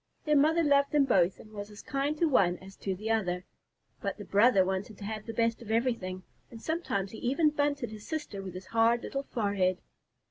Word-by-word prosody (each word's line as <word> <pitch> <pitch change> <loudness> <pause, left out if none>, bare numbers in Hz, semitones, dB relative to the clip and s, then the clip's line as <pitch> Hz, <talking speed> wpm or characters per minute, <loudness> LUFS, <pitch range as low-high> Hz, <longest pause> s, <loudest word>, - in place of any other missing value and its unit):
Their 300 -1 +3
mother 315 +4 +4
loved 280 -1 +3
them 290 -2 +5
both 185 -7 +3
and 215 - -14
was 205 -1 -7
as 210 - -12
kind 280 +3 -1
to 335 - +3
one 180 - +3
as 195 +2 -13
to 190 -1 -3
the 215 +4 -3
other, 180 -5 0 0.6
but 200 -3 -3
the 205 - -8
brother 205 -2 +5
wanted 190 +2 -3
to - - -10
have 215 +1 -5
the - - -3
best 230 +1 0
of 225 - -10
everything, 220 -6 -1 0.3
and 230 - -10
sometimes 220 - -2
he 220 - -8
even 295 +5 +2
bunted 285 -5 -1
his 215 -1 -10
sister 295 -11 -4
with 185 -2 -7
his 185 - -7
hard 230 +1 +2
little 275 - -3
forehead. 200 -8 0
220 Hz, 215 wpm, -30 LUFS, 195-275 Hz, 0.6 s, them